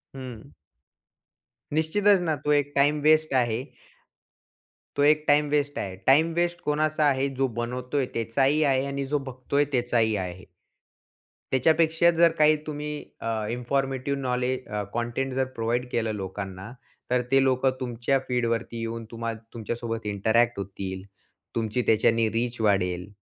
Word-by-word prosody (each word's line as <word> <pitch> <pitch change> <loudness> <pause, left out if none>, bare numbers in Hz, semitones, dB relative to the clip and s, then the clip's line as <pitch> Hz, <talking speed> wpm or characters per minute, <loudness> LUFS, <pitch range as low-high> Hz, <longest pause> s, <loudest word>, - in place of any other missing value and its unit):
हं. 125 -4 -9 1.2
निश्चितच 195 +6 +3
ना, 160 -3 0
तो 150 +1 -2
एक 145 0 +1
टाईम 145 +2 +3
वेस्ट 155 0 +4
आहे 120 -1 +1 1.3
तो 145 - +2
एक 150 +1 +4
टाईम 150 +1 +4
वेस्ट 145 0 0
आहे. 95 -2 -4
टाईम 155 +5 +5
वेस्ट 175 +1 0
कोणाचा 155 +1 +1
आहे? 135 -1 +2
जो 135 0 0
बनवतोय 125 +3 -2
त्याचाही 135 +7 +1
आहे 135 -2 +2
आणि 140 0 -3
जो 150 +2 +1
बघतोय 130 +3 -1
त्याचाही 120 -4 +1
आहे. 90 -1 -5 1.1
त्याच्यापेक्षा 160 +5 +4
जर 170 0 +4
काही 155 0 +5
तुम्ही 150 0 -4 0.3
अ, - - -4 0.2
इन्फॉर्मेटिव्ह 135 +2 -1
नॉलेज 125 0 -1
अ, 105 0 -2
कंटेंट 120 +3 -2
जर 130 0 +1
प्रोव्हाईड 120 +2 -1
केलं 115 -2 -1
लोकांना, 95 +1 -6 0.4
तर 125 0 +3
ते 135 0 +5
लोकं 130 0 +2
तुमच्या 125 +2 0
फीडवरती 115 -2 -1
येऊन, 115 0 -4
तुम्हा 115 0 -3 0.2
तुमच्यासोबत 115 0 -4
इंटरॅक्ट 110 +4 +2
होतील. 95 -1 -5 0.5
तुमची 115 +2 0
त्याच्याने 115 +1 +3
रीच 120 +1 -2
वाढेल, 90 -4 +1
125 Hz, 135 wpm, -26 LUFS, 115-145 Hz, 1.3 s, टाईम